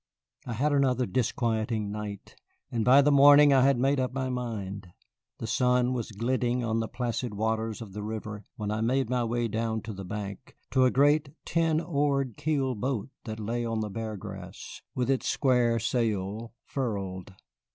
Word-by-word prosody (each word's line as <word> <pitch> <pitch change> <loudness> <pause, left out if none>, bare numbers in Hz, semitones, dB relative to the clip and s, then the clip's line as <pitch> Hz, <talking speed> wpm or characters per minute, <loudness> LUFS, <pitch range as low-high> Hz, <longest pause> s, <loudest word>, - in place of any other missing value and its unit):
I 120 - -3
had 145 +6 +1
another 130 -3 +2
disquieting 110 -1 -1
night, 105 -1 -6 0.4
and 115 -2 0
by 135 +4 +7
the 150 - +4
morning 145 +1 +8
I 135 - +5
had 135 0 +4
made 135 +3 +2
up 130 -1 0
my 130 0 -2
mind. 105 -6 -4 0.5
The - - -5
sun 125 +2 +2
was 120 -3 -3
glinting 120 +3 0
on 115 -1 0
the 115 - -1
placid 120 -2 -3
waters 110 +1 -1
of 100 -4 -12
the 105 - -5
river 105 -1 -5
when 105 -1 -3
I 110 +1 -1
made 125 +2 +1
my 125 -1 +1
way 120 0 0
down 110 0 -2
to 110 - -6
the 95 0 -7
bank, 100 +3 -7
to 130 -1 +4
a - - +5
great 145 +3 +3 0.2
ten 165 -2 +2
oared 140 - 0
keel 140 -4 0
boat 125 +1 -2 0.2
that 110 -1 -5
lay 115 +3 -2
on 115 -1 -1
the 105 -1 -3
Bear 110 0 -4
Grass, - - -9
with 125 -2 0
its 135 - 0
square 125 -4 +2
sail 110 -2 -1
furled. 100 -7 -4
120 Hz, 180 wpm, -28 LUFS, 110-130 Hz, 0.5 s, morning